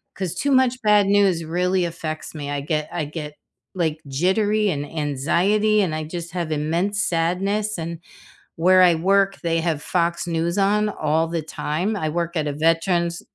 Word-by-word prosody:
'Cause 185 -2 -3
too 280 +9 -1
much 255 -1 +3
bad 210 -1 +5
news 195 -5 +3
really 180 +2 0
affects 160 -2 -6
me, 145 -1 -5
I 145 - -2
get 155 +1 -2
I 160 -4 -2
get, 150 0 -7 0.4
like, 160 -4 0
jittery 205 +8 +1
and 145 -3 -2
anxiety, 170 +9 +1
and 170 -5 -1
I 155 - -3
just 170 +1 -6
have 170 -3 -3
immense 170 +7 0
sadness 195 +5 0
and, 165 0 -5 0.6
where 185 +3 +5
I 175 -2 +6
work, 195 +3 +2
they 165 -1 0
have 160 -3 -1
Fox 170 -1 -1
News 170 +1 -1
on 210 +2 +2
all 160 -3 0
the 165 -1 -2
time. 160 +6 -2
I 155 -5 -2
work 170 +2 -3
at 150 - -1
a - - -2
veterans 170 +2 +1
170 Hz, 175 wpm, -22 LUFS, 160-195 Hz, 0.6 s, I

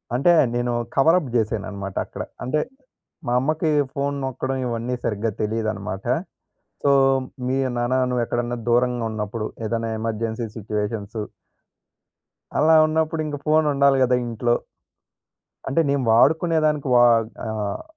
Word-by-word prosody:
అంటే 155 +7 +4 0.2
నేను 120 0 0 0.2
cover 165 +6 +5
up 140 -7 -7
జేశానన్నమాట 100 -3 -2
అక్కడ. - - -6 0.2
అంటే 150 +5 0 0.7
మా 120 - +1
అమ్మకి 155 +4 0 0.2
ఫోన్ 140 -1 -1
నొక్కడం 130 +1 -3
ఇవన్నీ 120 +1 -2
సరిగ్గా 110 0 -1
తెలియదన్నమాట. 105 -3 -3 0.8
సో 140 - +3 0.6
మీ 130 +1 0 0.2
నాన్న 120 +2 0 0.2
నువ్వు 125 -1 0
ఎక్కడైనా 120 +1 -2
దూరంగా 120 0 +2
ఉన్నప్పుడు 110 0 -4 0.2
ఏదైనా 115 +1 -2
ఎమర్జెన్సీ 115 +1 -2
సిచ్యుయేషన్స్ 105 0 -4 1.4
అలా 160 +2 +5
ఉన్నప్పుడు 160 0 0
ఇంగ 150 -1 -3
ఫోన్ 155 0 +3
ఉండాలి 140 -1 +4
గదా! 125 0 +3
ఇంట్లో. 120 +1 0 1.1
అంటే 140 +5 +2
నేను 140 -2 +1
వాడుకునే 160 +8 +4
దానికి 150 -2 0
వా 120 - +7 0.4
ఆహ్, 105 -2 -3
120 Hz, 125 wpm, -23 LUFS, 110-140 Hz, 1.4 s, వా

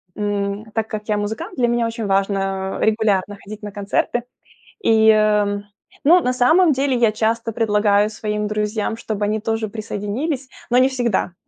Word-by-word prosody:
М, 205 0 -2
так 225 -1 -1
как 210 -1 -6
я 210 -1 +1
музыкант, 220 - -4
для 245 -3 +2
меня 240 0 +1
очень 230 -1 -3
важно, 195 -1 0
э, - - +3
регулярно 205 -2 +1
ходить 210 +2 -9
на 210 -1 -6
концерты. 205 +4 -1 0.6
И, 220 - +4
э, 210 -1 +3 0.4
ну, 345 +6 +6
на 250 -5 0
самом 315 +8 +4
деле 270 -1 +1
я 230 -3 +3
часто 225 +1 -1
предлагаю 210 -2 +2
своим 210 -1 -3
друзьям, 210 +1 -2
чтобы 215 -2 -3
они 215 +1 0
тоже 225 0 -1
присоединились, 225 +7 -4 0.2
но 245 - +3
не 255 +1 +6
всегда. 240 -8 -1
215 Hz, 165 wpm, -20 LUFS, 205-235 Hz, 0.6 s, ну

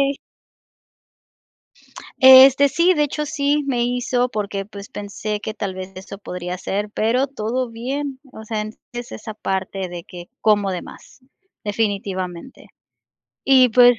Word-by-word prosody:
sí. - - -20 2.0
Este, 265 +1 +9
sí, 345 +5 +3
de 300 - +2
hecho, 300 +1 -3
sí 290 -1 0
me 250 -3 0
hizo 245 0 0
porque 200 -3 -3
pues 200 0 -10
pensé 205 +1 -5
que 220 - -4
tal 200 -3 -4
vez 185 0 -7
eso 195 +1 -9
podría 180 -2 -5
ser, 205 +3 -3
pero 235 +6 +1
todo 250 -1 -3
bien, 265 +4 -4
o 220 - -10
sea, 215 -1 -3
en 215 - -6 0.2
es 240 0 -6
esa 220 - -7
parte 190 -2 -3
de 175 -1 -8
que 175 -1 -11
como 205 -2 +3
de 180 -2 -3
más, - - -14 0.4
definitivamente. 200 -1 -3 0.8
Y 260 -2 +6
pues. 245 0 +6
220 Hz, 145 wpm, -21 LUFS, 200-260 Hz, 2.0 s, Este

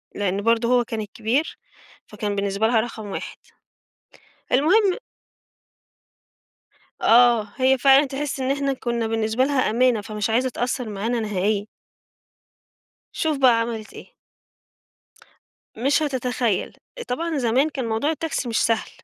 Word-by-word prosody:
لإن 200 0 -1
برضه 230 +1 +2
هو 250 -1 +4
كان 225 -1 -5
الكبير، 225 +8 -2 0.5
فكان 205 -2 -4
بالنسبة 200 +2 0
لها 230 -1 +3
رقم 220 -3 -7
1. 195 - -6 1.2
المهم 370 - +3 2.0
آه. 235 -2 +5
هي 265 0 +3
فعلًا 275 +2 +5
تحِس 275 +1 -4
إن 260 +1 0
إحنا 280 -1 0
كُنّا 235 -3 -2
بالنسبة 225 +2 0
لها 275 -5 +1
أمانة، 235 -1 +2
فمش 210 +1 -3
عايزة 250 +3 +1
تأثّر 245 -1 -3
معانا 225 +4 -2
نهائيًا. 205 0 -1 1.4
شوف 310 -3 -1
بقى 250 -4 +5
عملت 225 -2 -5
إيه. - - -13 1.6
مش 275 +7 +1
هتتخيّل. 250 -6 -1 0.3
طبعًا 320 +5 -2
زمان 260 +4 +2
كان 265 -4 -4
موضوع 225 +7 -1
التاكسي 320 -4 -3
مش 225 - 0
سهل، 225 -1 0
240 Hz, 125 wpm, -23 LUFS, 220-270 Hz, 2.0 s, آه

